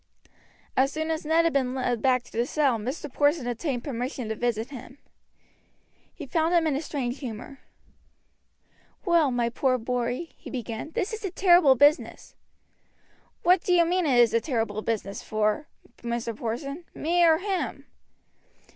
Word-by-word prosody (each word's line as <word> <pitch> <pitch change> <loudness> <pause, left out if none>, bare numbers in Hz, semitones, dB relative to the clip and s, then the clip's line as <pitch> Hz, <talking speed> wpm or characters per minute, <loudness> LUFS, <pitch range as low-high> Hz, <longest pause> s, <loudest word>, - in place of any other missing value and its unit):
As 270 +2 +3
soon 315 +2 -2
as 315 -1 -3
Ned 325 +1 +4
had 330 - +2
been 260 -2 0
led 245 -3 -1
back 255 -2 +2
to - - -18
the 235 +2 -1
cell 275 -7 +1
Mr. 260 +5 -5
Porson 290 -1 +2
obtained 245 +1 -3
permission 250 -3 -4
to 220 - -2
visit 235 +1 -2
him. 260 0 -10 1.1
He 310 - -9
found 325 +4 +1
him 335 -1 +3
in 305 -3 +1
a 280 - -1
strange 275 -4 -3
humor. 250 +1 -7 1.5
"Well, 340 -5 +4
my 240 -2 0
poor 255 +2 +1
boy," 245 +6 -2
he - - -11
began, 235 +1 -5
"this 390 - -2
is 440 - -6
a 390 - -1
terrible 350 -6 +5
business." 290 +5 +2 1.1
"Who 360 +1 +6
do 360 - 0
you 340 -1 +5
mean 355 0 +1
it 260 -4 +3
is 240 -2 +5
a 230 - +3
terrible 225 -7 -2
business 215 -3 -3
for, 215 +6 -1 0.3
Mr. 235 -1 -3
Porson, 275 +9 -4
me 345 +3 +2
or 325 -2 +6
him?" 380 +1 -3
265 Hz, 165 wpm, -26 LUFS, 235-320 Hz, 1.5 s, Who